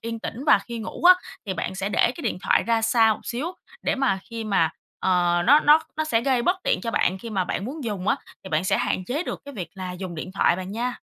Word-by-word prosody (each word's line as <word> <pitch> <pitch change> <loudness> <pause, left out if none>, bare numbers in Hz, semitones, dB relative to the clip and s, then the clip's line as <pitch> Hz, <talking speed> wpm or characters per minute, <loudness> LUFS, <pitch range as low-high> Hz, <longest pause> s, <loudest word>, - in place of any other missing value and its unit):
yên 230 0 -5
tĩnh, 255 +5 -6
và 215 - +6
khi 235 +3 -7
ngủ 220 - -7
á, 365 +1 +10 0.3
thì 190 - -2
bạn 185 +2 -3
sẽ 195 +1 -2
để 205 - +1
cái 260 +6 +1
điện 225 - -2
thoại - - +3
ra 230 -1 +1
xa 225 -1 +4
một - - -12
xíu 250 +7 -3 0.4
để - - +1
mà 265 -8 +1
khi 230 -1 -5
mà, 180 -6 +2 0.3
ờ, 175 -2 +2
nó 290 +4 +7
nó 300 +1 +6 0.2
nó 315 - 0
sẽ 230 -7 +1
gây 250 -1 +1
bất 360 +6 +2
tiện - - +1
cho 230 - -3
bạn 190 -4 +1
khi 230 +2 -8
mà 190 -3 0
bạn 190 - -3
muốn 275 +3 -6
dùng 200 -4 -3
á, - - +3 0.3
thì - - -7
bạn 155 +3 +1
sẽ - - +2
hạn 185 - -1
chế 280 - -2
được - - -5
cái 285 - -9
việc 185 -6 -5
là 185 -1 -5
dùng 180 -1 -6
điện 170 +3 -6
thoại, 175 - +3
bạn 185 +1 -6
nha. 245 +2 -2
225 Hz, 275 wpm, -24 LUFS, 185-250 Hz, 0.4 s, á